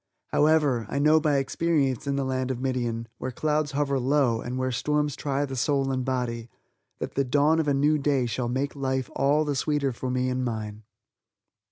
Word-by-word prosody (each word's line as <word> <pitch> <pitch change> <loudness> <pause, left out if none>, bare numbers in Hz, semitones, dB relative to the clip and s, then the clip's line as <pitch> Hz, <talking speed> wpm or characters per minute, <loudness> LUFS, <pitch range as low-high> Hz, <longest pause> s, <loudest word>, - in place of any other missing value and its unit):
However, 145 -7 +2
I - - -3
know 155 +2 +5
by 150 -2 +2
experience 140 -2 0
in 140 - 0
the 140 - 0
land 130 0 -1
of 130 -2 -2
Midian, 120 -3 -2
where 130 - -3
clouds 150 +3 -1
hover 140 -1 0
low, 130 -3 +2
and 125 +1 -4
where 130 0 -1
storms 150 +2 0
try 140 0 -1
the 135 -1 -6
soul 135 +1 +1
and 130 -1 -1
body, 120 -3 -2 0.5
that - - -5
the 140 - +1
dawn 145 +5 +3
of 160 - 0
a 145 - +3
new 150 +2 +3
day 140 -3 +1
shall 120 +1 -2
make 135 +4 -2
life 130 -2 -2
all 145 +3 +2
the 145 -1 -1
sweeter 145 -1 0
for 125 +1 -5
me 125 0 0
and 130 0 -1
mine. 110 -3 -4
135 Hz, 200 wpm, -26 LUFS, 125-145 Hz, 0.5 s, know